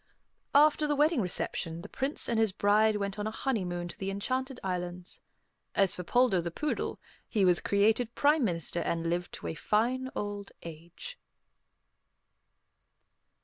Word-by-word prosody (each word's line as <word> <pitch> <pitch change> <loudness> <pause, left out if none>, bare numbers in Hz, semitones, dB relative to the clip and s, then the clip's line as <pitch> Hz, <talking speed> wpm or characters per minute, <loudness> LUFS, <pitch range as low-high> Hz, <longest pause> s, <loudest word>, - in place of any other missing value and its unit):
After 300 +1 +5
the 295 - +1
wedding 300 -1 +3
reception, 170 -2 -2
the - - -7
Prince 270 +7 -2
and 230 -1 +1
his 220 -3 +3
bride 210 +3 +3
went 200 0 -3
on 210 - -2
a - - 0
honeymoon 185 -8 -2
to - - -9
the 195 - -2
Enchanted 255 +6 -3
Islands. 180 -1 -4 0.5
As 195 -2 +4
for 180 - -5
Poldo 240 -3 +3
the 170 - -3
poodle, 300 - -3 0.3
he 205 -4 +2
was 180 -1 +4
created 220 +4 +2
Prime 295 0 +3
Minister 170 -4 -1
and 165 0 -1
lived 175 +1 -2
to - - -8
a - - -2
fine 245 +9 0
old 205 -1 -5
age. 170 - -10
205 Hz, 150 wpm, -30 LUFS, 180-255 Hz, 0.5 s, After